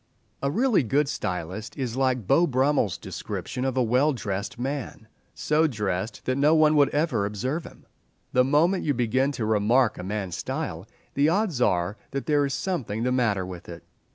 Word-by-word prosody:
A 140 - 0
really 230 - +3
good 140 +4 +1
stylist 95 - -4
is 125 -4 -3
like 130 -4 0
Beau 170 - +4
Brummell's 135 - +1
description 125 - -5
of 130 -1 -1
a 130 - +4
well 130 +6 +2
dressed 100 -4 -4
man—so 140 +4 -2
dressed 105 -5 -3
that 130 +1 0
no 150 +3 +5
one 155 -1 +5
would 145 -2 +5
ever 145 -8 0
observe 125 - -3
him. - - -14 0.5
The 125 - +5
moment 155 +8 +2
you 145 -3 0
begin 130 +3 +1
to 120 -4 -3
remark 110 +3 +2
a - - -5
man's 95 -2 -3
style 85 +5 -4 0.3
the 145 +2 +3
odds 180 - 0
are 90 -1 +1
that 140 0 -4
there 145 -2 +2
is 135 - -3
something 130 - -2
the 125 - +1
matter 110 -7 +1
with 90 -2 -9
it. 85 0 -9
130 Hz, 180 wpm, -25 LUFS, 105-145 Hz, 0.5 s, no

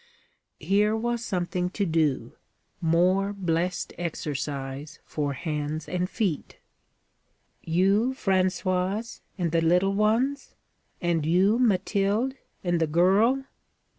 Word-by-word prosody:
Here 210 +3 +2
was 235 +1 -1
something 180 -2 -1
to 200 +2 -1
do 160 -5 0 0.5
more 185 +5 +2
blessed 180 -2 -1
exercise 145 -2 -4
for 145 -2 -2
hands 150 0 -3
and 180 0 -1
feet. 190 -11 -2 1.0
'You, 195 +9 +2
Françoise? 185 +2 0 0.2
and 175 -4 -1
the 165 0 +2
little 180 +4 +3
ones? 230 +7 +1 0.5
And 170 -3 +1
you, 185 +8 +3
Mathilde? 205 +2 +1 0.3
and 175 -2 +1
the 160 - +2
girl? 195 - +3
180 Hz, 105 wpm, -26 LUFS, 165-205 Hz, 1.0 s, little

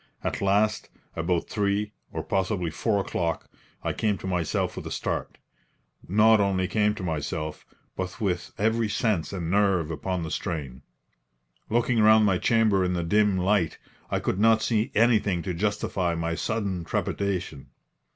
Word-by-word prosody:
At - - -2
last, 105 +2 +1 0.3
about 85 +1 0
3 105 0 0 0.2
or - - -4
possibly 95 -3 -1
4 100 +5 0
o'clock, 85 -3 -2 0.4
I - - -1
came 105 -3 0
to 80 - -9
myself 90 -4 -1
with - - -6
a - - -7
start - - -3 0.7
not 110 +3 +5
only 95 -2 +1
came 105 +1 +1
to 95 - -7
myself, 80 -1 -4 0.3
but 95 +3 -5
with 95 -5 -2
every 110 +1 +1
sense 100 -5 0
and 85 -4 -3
nerve 95 -5 +2
upon 85 +3 -3
the 80 - -5
strain. 75 -9 -4 0.9
Looking 120 0 +2
round 110 0 +6
my 95 -3 +2
chamber 110 -4 +3
in 90 0 0
the 85 -1 -1
dim 105 +3 +3
light, 95 -2 +1 0.3
I - - 0
could 95 - -2
not 110 0 +4
see 110 +1 +1
anything 105 -6 +3
to 90 - -3
justify 95 -2 -1
my 85 0 -2
sudden 100 -1 -2
trepidation. 90 -4 -2
95 Hz, 155 wpm, -26 LUFS, 85-105 Hz, 0.9 s, round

